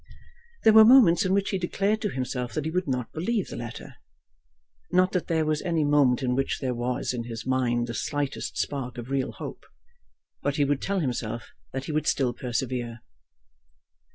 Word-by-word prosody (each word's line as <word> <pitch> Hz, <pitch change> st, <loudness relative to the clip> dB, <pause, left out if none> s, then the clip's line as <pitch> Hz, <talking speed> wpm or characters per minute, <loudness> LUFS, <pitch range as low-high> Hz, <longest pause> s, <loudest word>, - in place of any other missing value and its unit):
There 220 Hz, -, +7 dB
were 220 Hz, 0 st, +10 dB
moments 220 Hz, -6 st, +7 dB
in 185 Hz, -, +1 dB
which 200 Hz, 0 st, 0 dB
he 195 Hz, -, -1 dB
declared 200 Hz, +4 st, 0 dB
to 210 Hz, -, 0 dB
himself 125 Hz, -4 st, -3 dB
that 155 Hz, -, -2 dB
he 160 Hz, -, -2 dB
would 180 Hz, 0 st, -1 dB
not 125 Hz, -3 st, -2 dB
believe 195 Hz, +5 st, -1 dB
the -, -, -6 dB
letter, 120 Hz, -1 st, -8 dB, 0.9 s
not 185 Hz, +1 st, +3 dB
that 180 Hz, -, -1 dB
there 160 Hz, -2 st, +1 dB
was 155 Hz, 0 st, 0 dB
any 165 Hz, -4 st, 0 dB
moment 145 Hz, -3 st, +3 dB
in 125 Hz, -1 st, +1 dB
which 135 Hz, +2 st, 0 dB
there 130 Hz, -2 st, -2 dB
was 125 Hz, +1 st, -2 dB
in 120 Hz, -2 st, -4 dB
his 115 Hz, -1 st, -6 dB
mind 125 Hz, -2 st, +1 dB
the 120 Hz, -, -5 dB
slightest 145 Hz, +2 st, -3 dB
spark 125 Hz, -3 st, -3 dB
of 120 Hz, +2 st, -7 dB
real 135 Hz, -1 st, 0 dB
hope. -, -, -8 dB, 0.8 s
But 145 Hz, -1 st, -1 dB
he 145 Hz, -, +2 dB
would 140 Hz, -1 st, 0 dB
tell 195 Hz, -1 st, -1 dB
himself 120 Hz, -4 st, -3 dB, 0.2 s
that 135 Hz, 0 st, -4 dB
he -, -, -4 dB
would 155 Hz, 0 st, -1 dB
still 125 Hz, -3 st, +1 dB
persevere. 120 Hz, -1 st, -3 dB
135 Hz, 190 wpm, -26 LUFS, 125-175 Hz, 0.9 s, were